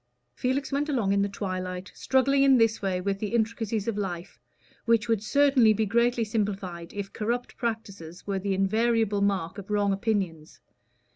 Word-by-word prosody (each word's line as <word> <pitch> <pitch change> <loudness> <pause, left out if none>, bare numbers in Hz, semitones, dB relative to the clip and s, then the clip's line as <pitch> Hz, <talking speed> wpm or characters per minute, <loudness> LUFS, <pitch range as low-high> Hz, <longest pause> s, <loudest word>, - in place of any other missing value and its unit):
Felix 260 - -1
went 290 +2 0
along 225 -9 +1
in 200 - +2
the 200 - 0
twilight 185 -1 -4
struggling 275 +1 +2
in 270 -1 +6
this 225 -1 +2
way 190 -2 -1
with 195 +1 -2
the 215 +2 -2
intricacies 225 -2 -1
of 215 -2 -1
life, 175 -3 -5 0.5
which 230 0 +3
would 225 -3 +1
certainly 265 -2 +4
be 220 +1 0
greatly 235 +3 +2
simplified 200 -6 -3
if 200 -1 -6
corrupt 235 +3 -2
practices 200 -7 -5
were 195 -1 -1
the 195 0 -1
invariable 215 +1 +1
mark 195 -1 0
of 200 - -10
wrong 205 -1 +2
opinions. 195 -7 -2
210 Hz, 165 wpm, -27 LUFS, 195-230 Hz, 0.5 s, in